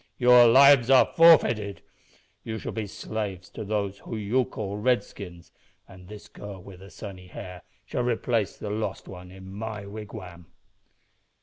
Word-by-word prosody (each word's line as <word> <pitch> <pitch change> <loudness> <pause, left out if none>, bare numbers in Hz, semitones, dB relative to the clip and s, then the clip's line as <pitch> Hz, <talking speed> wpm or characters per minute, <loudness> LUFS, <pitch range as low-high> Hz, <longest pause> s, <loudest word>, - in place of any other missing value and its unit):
Your 125 -1 +7
lives 135 0 +6
are 135 -1 +7
forfeited. 120 -12 +4 0.6
You 110 0 -5
shall - - -6
be 110 -2 -4
slaves 100 -3 -6
to - - -7
those 100 -1 -3
whom 115 - -7
you 115 +5 0
call 100 -3 -6
Redskins, 100 -7 -3 0.4
and 90 -1 -15
this 105 +1 -11
girl 100 -2 -10
with 90 0 -13
the 95 +1 -13
sunny 95 -3 -10
hair 90 0 -9 0.2
shall - - -3
replace 120 -3 -1
the 105 - -6
lost 105 -2 -4
one 90 -1 -10
in 95 0 -13
my 105 0 -6
wigwam." 100 -5 -10
105 Hz, 150 wpm, -26 LUFS, 95-115 Hz, 0.6 s, Your